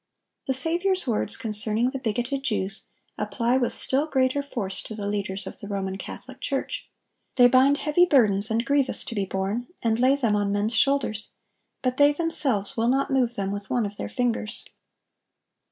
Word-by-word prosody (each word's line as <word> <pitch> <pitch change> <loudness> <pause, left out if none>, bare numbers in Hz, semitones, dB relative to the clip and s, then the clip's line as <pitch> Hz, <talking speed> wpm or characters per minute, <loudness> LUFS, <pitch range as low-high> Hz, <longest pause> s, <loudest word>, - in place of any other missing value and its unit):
The 265 - +1
Saviour's 350 +7 +2
words 220 -3 +1
concerning 220 +2 +3
the 270 - -5
bigoted 245 +3 -2
Jews, 205 -6 -2 0.3
apply 240 +1 0
with 245 - 0
still 280 +4 +2
greater 265 -1 +1
force 220 -9 -4
to 220 - -8
the 205 -1 -5
leaders 200 -1 -3
of - - -9
the 205 - -9
Roman 195 -2 -3
Catholic - - -9
Church: - - -3 0.5
"They 245 -1 +7
bind 260 +3 +4
heavy 315 +5 +2
burdens 215 - +4
and 225 +2 0
grievous 280 -1 +1
to - - -6
be 200 -3 -1
borne, 195 +6 -3 0.2
and 225 -1 +1
lay 260 +2 +4
them 235 -7 0
on 205 -1 0
men's 205 +3 0
shoulders; 275 -6 +1 0.5
but 255 0 -1
they 290 0 +5
themselves 285 - +1
will 230 0 0
not 270 +2 0
move 250 -3 +1
them 195 -1 -3
with 200 -1 -6
one 240 -3 0
of 205 0 -7
their - - -5
fingers." 235 -3 -3
240 Hz, 180 wpm, -25 LUFS, 205-270 Hz, 0.5 s, They